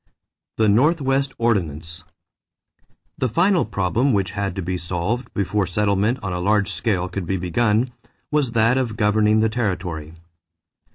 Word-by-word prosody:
=The 110 - +3
Northwest 135 +3 +2
Ordinance.= 85 -6 -1 1.2
The 130 - +1
final 175 - +2
problem 105 +6 0
which 95 -3 0
had 100 -2 -3
to 95 - -3
be 90 +2 -2
solved 90 +8 -3
before 100 0 0
settlement 100 +5 +1
on 95 -3 -3
a 90 - -2
large 100 +2 +1
scale 95 -6 -1
could 90 -1 -5
be 95 - 0
begun 105 +7 +1 0.4
was 145 -5 +1
that 115 +3 +3
of 115 -4 -3
governing 105 0 +3
the 110 - +3
territory. 90 -8 -3
105 Hz, 145 wpm, -22 LUFS, 90-120 Hz, 1.2 s, =The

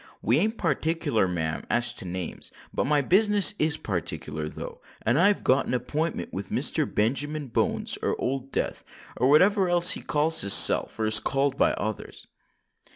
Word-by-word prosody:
We 120 +7 +2
ain't 220 +5 -1
partickler, 155 - -1
ma'am, 80 -3 -3
as 120 0 +2
to 110 - -9
names; 90 -1 -5 0.2
but - - -2
my 145 0 +2
business 205 +6 +3
is 155 0 +1
partickler, 75 -5 -4
though—and 120 - -4
I've 200 +3 +2
got 130 +2 +1
an - - -1
appintment 155 +7 -4
with 95 0 -6
Mr. - - 0
Benjamin 140 +6 -1
Bones—or - - -1
Old 135 +1 -4
Death—or 125 +3 -4
whatever 185 +5 +3
else 175 0 +5
he - - +1
calls 155 +2 +1
his 100 - +4
self - - +5
or 110 - -2
is 110 0 +5
called 135 0 -1
by - - +1
others." 110 -1 -6
135 Hz, 155 wpm, -25 LUFS, 110-165 Hz, 0.2 s, else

